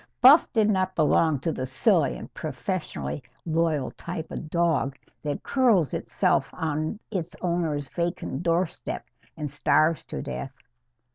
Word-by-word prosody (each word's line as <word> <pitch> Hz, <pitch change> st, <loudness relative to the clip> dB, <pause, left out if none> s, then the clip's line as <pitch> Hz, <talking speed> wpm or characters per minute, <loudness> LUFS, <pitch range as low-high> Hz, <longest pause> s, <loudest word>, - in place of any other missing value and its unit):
Buff 270 Hz, +6 st, +8 dB
did 220 Hz, -2 st, +3 dB
not 185 Hz, -2 st, +1 dB
belong 155 Hz, -1 st, +3 dB
to 165 Hz, -, 0 dB
the 130 Hz, -4 st, -3 dB
silly 130 Hz, -1 st, +2 dB
and -, -, -10 dB
professionally 70 Hz, +3 st, -4 dB, 0.2 s
loyal 160 Hz, -4 st, +1 dB
type 165 Hz, -2 st, -6 dB
of 155 Hz, -, -6 dB
dog 160 Hz, -5 st, +1 dB, 0.2 s
that 145 Hz, -1 st, -3 dB
curls 230 Hz, -, +3 dB
itself -, -, +1 dB
on 155 Hz, +5 st, -2 dB
its 175 Hz, -5 st, -3 dB
owner's 165 Hz, -5 st, -1 dB
vacant 170 Hz, -3 st, -3 dB
doorstep 170 Hz, 0 st, -1 dB, 0.3 s
and 150 Hz, -1 st, -3 dB
starves 150 Hz, +3 st, +2 dB
to -, -, -5 dB
death. 135 Hz, -1 st, -5 dB
160 Hz, 135 wpm, -26 LUFS, 145-175 Hz, 0.3 s, Buff